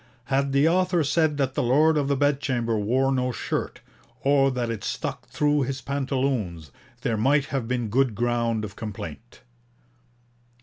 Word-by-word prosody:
Had 140 Hz, 0 st, +2 dB
the 140 Hz, +3 st, +4 dB
author 180 Hz, 0 st, +2 dB
said 150 Hz, +1 st, +1 dB
that 135 Hz, -2 st, 0 dB
the -, -, 0 dB
Lord 150 Hz, +6 st, +4 dB
of 145 Hz, -2 st, +1 dB
the 140 Hz, -, +2 dB
Bedchamber 130 Hz, -5 st, 0 dB
wore 125 Hz, +6 st, +1 dB
no 125 Hz, -1 st, 0 dB
shirt, -, -, -4 dB, 0.4 s
or 135 Hz, 0 st, +4 dB
that 125 Hz, -3 st, -2 dB
it 110 Hz, -3 st, -5 dB
stuck -, -, -4 dB
through 150 Hz, 0 st, +1 dB
his 135 Hz, +1 st, -2 dB
pantaloons, 130 Hz, -, -2 dB, 0.3 s
there 115 Hz, -4 st, 0 dB
might 140 Hz, +6 st, +3 dB
have 130 Hz, -4 st, -1 dB
been 120 Hz, -2 st, -1 dB
good 125 Hz, +1 st, +1 dB
ground 115 Hz, -1 st, 0 dB
of 100 Hz, -1 st, -10 dB
complaint.' 105 Hz, 0 st, -8 dB
130 Hz, 160 wpm, -25 LUFS, 115-140 Hz, 0.4 s, the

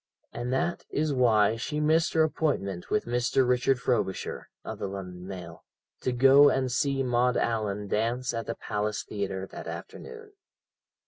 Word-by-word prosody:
And 120 Hz, +1 st, -4 dB
that 135 Hz, +6 st, -1 dB
is 150 Hz, 0 st, 0 dB
why 115 Hz, -4 st, +3 dB
she 150 Hz, +7 st, -3 dB
missed 160 Hz, +2 st, +2 dB
her 160 Hz, -, +4 dB
appointment 120 Hz, -, -1 dB
with 105 Hz, -, +1 dB
Mr. 120 Hz, +2 st, +1 dB
Richard 125 Hz, +1 st, +2 dB
Frobisher 105 Hz, -7 st, -2 dB, 0.2 s
(of -, -, -6 dB
the -, -, -2 dB
London 90 Hz, -2 st, -7 dB
Mail) 90 Hz, -4 st, -8 dB, 0.4 s
to 130 Hz, -, -1 dB
go 135 Hz, +3 st, +7 dB
and 130 Hz, -2 st, 0 dB
see 135 Hz, +2 st, +1 dB
Maud 125 Hz, 0 st, +2 dB
Allan 105 Hz, -3 st, -1 dB
dance 120 Hz, +5 st, -1 dB
at 115 Hz, 0 st, -4 dB
the 115 Hz, -, -3 dB
Palace 105 Hz, 0 st, -2 dB
Theatre 95 Hz, -2 st, -4 dB
that -, -, -9 dB
afternoon. 450 Hz, -2 st, -9 dB
120 Hz, 155 wpm, -28 LUFS, 105-135 Hz, 0.4 s, go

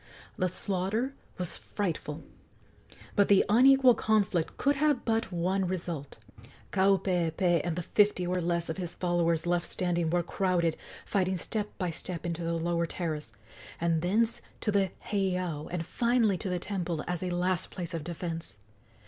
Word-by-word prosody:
The 185 Hz, -1 st, 0 dB
slaughter 195 Hz, +8 st, -1 dB, 0.2 s
was 180 Hz, -2 st, -3 dB
frightful; 165 Hz, -6 st, -3 dB, 0.9 s
but 200 Hz, -2 st, +4 dB
the 200 Hz, -1 st, +5 dB
unequal 255 Hz, +4 st, +7 dB
conflict 205 Hz, -7 st, +1 dB
could 280 Hz, 0 st, +2 dB
have 295 Hz, -3 st, +2 dB
but 225 Hz, -2 st, 0 dB
one 185 Hz, +2 st, 0 dB
result. 170 Hz, -6 st, -4 dB, 0.5 s
Kaupeepee 180 Hz, -3 st, +2 dB
and 175 Hz, -2 st, -1 dB
the 175 Hz, -, -3 dB
fifty 205 Hz, -1 st, +3 dB
or 180 Hz, +1 st, 0 dB
less 170 Hz, 0 st, 0 dB
of 160 Hz, -, -4 dB
his 175 Hz, -3 st, -4 dB
followers 170 Hz, -2 st, +1 dB
left 175 Hz, 0 st, +1 dB
standing 175 Hz, -2 st, 0 dB
were 175 Hz, +1 st, +1 dB
crowded, 175 Hz, -2 st, +1 dB, 0.3 s
fighting 185 Hz, -1 st, +1 dB
step 210 Hz, +4 st, -2 dB
by 180 Hz, -3 st, -1 dB
step, 170 Hz, +1 st, -4 dB
into 170 Hz, 0 st, -2 dB
the 165 Hz, 0 st, -1 dB
lower 170 Hz, 0 st, 0 dB
terrace, 155 Hz, -8 st, -4 dB, 0.5 s
and 165 Hz, -1 st, +1 dB
thence 220 Hz, +6 st, +1 dB, 0.2 s
to 210 Hz, -, +1 dB
the 200 Hz, -2 st, +2 dB, 0.2 s
heiau, 180 Hz, -6 st, -1 dB
and 170 Hz, -1 st, -3 dB
finally 235 Hz, -3 st, +2 dB
to 195 Hz, -, -3 dB
the 180 Hz, -, 0 dB
temple 175 Hz, -4 st, -3 dB
as 175 Hz, -1 st, -2 dB
a 185 Hz, -, -2 dB
last 180 Hz, +1 st, 0 dB
place 175 Hz, -1 st, -5 dB
of 165 Hz, -3 st, -3 dB
defence. 165 Hz, -, -5 dB
180 Hz, 155 wpm, -29 LUFS, 170-200 Hz, 0.9 s, unequal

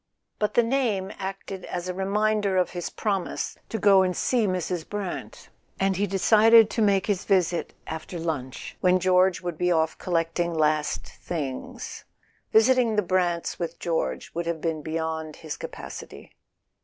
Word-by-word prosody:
But 210 Hz, -, 0 dB
the 240 Hz, -, +6 dB
name 225 Hz, -6 st, 0 dB
acted 195 Hz, 0 st, -5 dB
as 175 Hz, 0 st, -4 dB
a 180 Hz, -, -2 dB
reminder 200 Hz, +1 st, +1 dB
of 180 Hz, -2 st, +2 dB
his 175 Hz, -1 st, -4 dB
promise 195 Hz, -4 st, -2 dB
to 225 Hz, -, -2 dB
go 195 Hz, -2 st, +6 dB
and 185 Hz, -1 st, 0 dB
see 240 Hz, -4 st, +2 dB
Mrs. 180 Hz, -2 st, -2 dB
Brant, 205 Hz, -3 st, -5 dB, 0.3 s
and 195 Hz, 0 st, +2 dB
he 205 Hz, +2 st, 0 dB
decided 220 Hz, +3 st, +6 dB
to 230 Hz, -, -1 dB
make 200 Hz, -3 st, +3 dB
his 200 Hz, -4 st, 0 dB
visit 180 Hz, -3 st, +1 dB
after 160 Hz, +2 st, -6 dB
lunch, 150 Hz, -6 st, -4 dB
when 185 Hz, 0 st, +4 dB
George 185 Hz, -1 st, +3 dB
would 175 Hz, -3 st, -5 dB
be 180 Hz, 0 st, +2 dB
off 160 Hz, -1 st, +1 dB
collecting 170 Hz, 0 st, -1 dB
last 155 Hz, -1 st, +1 dB
things. 140 Hz, -7 st, -6 dB, 0.5 s
Visiting 230 Hz, 0 st, +4 dB
the 210 Hz, -, +2 dB
Brants 175 Hz, -2 st, 0 dB
with 170 Hz, -1 st, -3 dB
George 165 Hz, -2 st, -2 dB
would 170 Hz, 0 st, -3 dB
have 170 Hz, -1 st, -1 dB
been 160 Hz, -1 st, -2 dB
beyond 160 Hz, 0 st, -3 dB
his 155 Hz, -2 st, -6 dB
capacity. -, -, -9 dB
185 Hz, 155 wpm, -26 LUFS, 165-200 Hz, 0.5 s, the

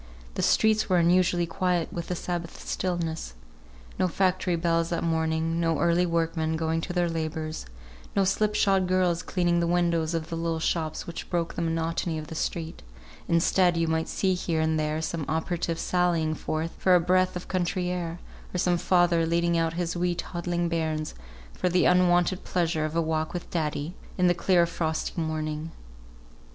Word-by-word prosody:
The -, -, -2 dB
streets 220 Hz, -1 st, +3 dB
were 185 Hz, -, +4 dB
unusually 175 Hz, 0 st, +3 dB
quiet 180 Hz, 0 st, -1 dB
with 170 Hz, -1 st, -5 dB
a 180 Hz, -, -1 dB
Sabbath 175 Hz, -1 st, -5 dB
stillness. 165 Hz, -, -2 dB, 0.6 s
No 185 Hz, -, +3 dB
factory 185 Hz, 0 st, +1 dB
bells 165 Hz, 0 st, +1 dB
that 170 Hz, -1 st, -1 dB
morning; 160 Hz, 0 st, 0 dB
no 165 Hz, -1 st, +1 dB
early 170 Hz, +1 st, +2 dB
workmen 165 Hz, -1 st, 0 dB
going 160 Hz, 0 st, 0 dB
to 175 Hz, -, -5 dB
their 175 Hz, -1 st, +1 dB
labours; 160 Hz, -, -4 dB, 0.5 s
no 195 Hz, -, +4 dB
slip 210 Hz, +2 st, +1 dB
shod 195 Hz, -3 st, +3 dB
girls 180 Hz, -2 st, +2 dB
cleaning 175 Hz, -2 st, +1 dB
the 170 Hz, -, +1 dB
windows 170 Hz, -2 st, +1 dB
of 160 Hz, -1 st, -3 dB
the -, -, -1 dB
little 165 Hz, 0 st, -1 dB
shops 160 Hz, -1 st, -1 dB
which 170 Hz, -, -7 dB
broke 170 Hz, -2 st, -1 dB
the -, -, -3 dB
monotony 165 Hz, 0 st, -1 dB
of 155 Hz, 0 st, -7 dB
the -, -, -6 dB
street; 160 Hz, 0 st, -3 dB, 0.5 s
instead, 175 Hz, +1 st, +3 dB
you 165 Hz, 0 st, +1 dB
might 160 Hz, 0 st, 0 dB
see 190 Hz, -1 st, +1 dB
here 170 Hz, -3 st, -1 dB
and 160 Hz, 0 st, +1 dB
there 155 Hz, +1 st, -1 dB
some 165 Hz, -1 st, -2 dB
operative 165 Hz, +1 st, -1 dB
sallying 170 Hz, -4 st, +1 dB
forth 155 Hz, +1 st, -3 dB
for 185 Hz, -1 st, +5 dB
a -, -, +6 dB
breath 185 Hz, +2 st, +2 dB
of 180 Hz, -, -6 dB
country 180 Hz, 0 st, -1 dB
air, 170 Hz, -2 st, -3 dB, 0.4 s
or -, -, +1 dB
some 175 Hz, -1 st, +2 dB
father 175 Hz, -2 st, +3 dB
leading 170 Hz, +1 st, +1 dB
out 165 Hz, -1 st, +1 dB
his 170 Hz, 0 st, -2 dB
wee 175 Hz, 0 st, 0 dB
toddling 175 Hz, 0 st, -2 dB
bairns 160 Hz, -2 st, -2 dB, 0.4 s
for 180 Hz, -, 0 dB
the 180 Hz, +1 st, +3 dB
unwonted 180 Hz, 0 st, +3 dB
pleasure 165 Hz, -3 st, 0 dB
of 155 Hz, +1 st, -4 dB
a 170 Hz, -, +3 dB
walk 160 Hz, 0 st, -1 dB
with 175 Hz, -, -6 dB
"Daddy," 155 Hz, -1 st, -2 dB, 0.2 s
in 180 Hz, -, +3 dB
the 175 Hz, -, +5 dB
clear 175 Hz, 0 st, +3 dB
frosty 165 Hz, 0 st, -2 dB
morning. 155 Hz, 0 st, -3 dB
170 Hz, 180 wpm, -27 LUFS, 160-180 Hz, 0.6 s, a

